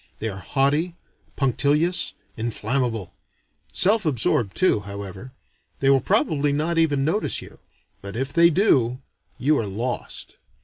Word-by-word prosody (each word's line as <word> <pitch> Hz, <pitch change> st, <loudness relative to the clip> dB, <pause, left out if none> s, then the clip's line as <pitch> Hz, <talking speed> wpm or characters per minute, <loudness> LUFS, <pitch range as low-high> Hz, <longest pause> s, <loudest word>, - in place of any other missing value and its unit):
They 110 Hz, -, -3 dB
are 95 Hz, -2 st, -7 dB
haughty, 145 Hz, -, 0 dB, 0.4 s
punctilious, 145 Hz, +6 st, +1 dB, 0.2 s
inflammable: 115 Hz, -1 st, -2 dB, 0.6 s
self 210 Hz, +4 st, +3 dB
absorbed 120 Hz, -, +1 dB
too, 185 Hz, -, +3 dB
however. 100 Hz, +3 st, -8 dB, 0.5 s
They 135 Hz, 0 st, +4 dB
will 135 Hz, -1 st, +4 dB
probably 145 Hz, +2 st, +1 dB
not 160 Hz, +4 st, 0 dB
even 145 Hz, -4 st, +2 dB
notice 175 Hz, +8 st, +1 dB
you; -, -, -12 dB, 0.4 s
but 100 Hz, +1 st, -8 dB
if 135 Hz, +4 st, -3 dB
they 170 Hz, +2 st, +6 dB
do, 130 Hz, -, +2 dB, 0.4 s
you 145 Hz, +4 st, +2 dB
are 110 Hz, -, -2 dB
lost. 115 Hz, +6 st, -5 dB
135 Hz, 130 wpm, -23 LUFS, 115-155 Hz, 0.6 s, they